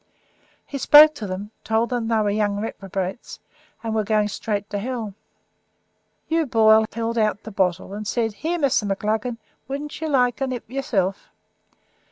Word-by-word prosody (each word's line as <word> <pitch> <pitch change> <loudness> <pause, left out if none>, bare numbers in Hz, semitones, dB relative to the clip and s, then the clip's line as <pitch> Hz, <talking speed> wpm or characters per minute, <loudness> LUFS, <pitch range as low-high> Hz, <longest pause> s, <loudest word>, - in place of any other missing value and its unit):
He 280 - -6
spoke 300 +3 +8
to 225 -9 -6
them, 195 +3 -5
told 225 +2 0
them 240 -2 -1
that 230 - +1
they 215 - +2
were 205 - +1
young 205 -1 0
reprobates, 195 -1 -5 0.5
and 225 -1 -2
were 220 -1 +1
going 210 0 +1
straight 205 0 -3
to 205 - -2
hell. 225 -2 -4 1.1
Hugh 325 -1 0
Boyle 220 -2 +5
held 230 +1 -2
out 215 -1 0
the 220 - -8
bottle, 190 -1 -1
and 210 0 -5
said, 225 -2 0
'Here, 330 +10 -2
Mr. 270 -9 +1
McLaggan, 220 +4 -1 0.3
wouldn't 285 +4 -5
you 320 - -1
like 250 -3 +2
a 270 - +1
nip 250 -2 -5
yourself?' 215 -7 -2
220 Hz, 170 wpm, -23 LUFS, 205-250 Hz, 1.1 s, spoke